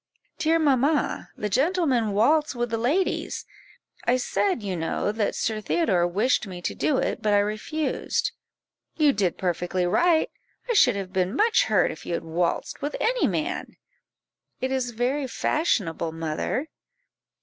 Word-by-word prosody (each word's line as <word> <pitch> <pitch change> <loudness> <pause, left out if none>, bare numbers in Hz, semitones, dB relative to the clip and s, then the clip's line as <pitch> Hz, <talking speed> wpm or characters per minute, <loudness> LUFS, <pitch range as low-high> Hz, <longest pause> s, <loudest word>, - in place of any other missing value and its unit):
"Dear 325 0 +3
mamma, 290 -1 +1
the 210 - -2
gentlemen 260 - +1
waltz 295 +8 +3
with 240 -1 -2
the 225 - 0
ladies; 300 +11 0 0.6
I 245 +1 +3
said, 255 - 0
you 195 -2 -2
know, 165 +4 -1
that 215 -1 -1
Sir 215 -1 -1
Theodore 195 - +1
wished 215 +5 +1
me 180 -2 -7
to 175 - -3
do 285 - +1
it, - - -1
but 210 -2 +2
I - - +5
refused." 215 +10 -1 0.7
"You 300 -3 +4
did 190 -4 0
perfectly 180 0 -1
right; 320 - +3 0.4
I 480 - +1
should 250 - +5
have 190 -2 -5
been 185 +3 0
much 455 +5 +3
hurt - - +2
if - - -10
you 170 - -2
had - - -4
waltzed 170 +1 -2
with 290 +1 -3
any - - +2
man." - - -3 0.8
"It 260 +1 -2
is 260 -2 0
very 250 +4 -1
fashionable, 195 - 0
mother." 165 - -2
240 Hz, 155 wpm, -25 LUFS, 190-300 Hz, 0.8 s, I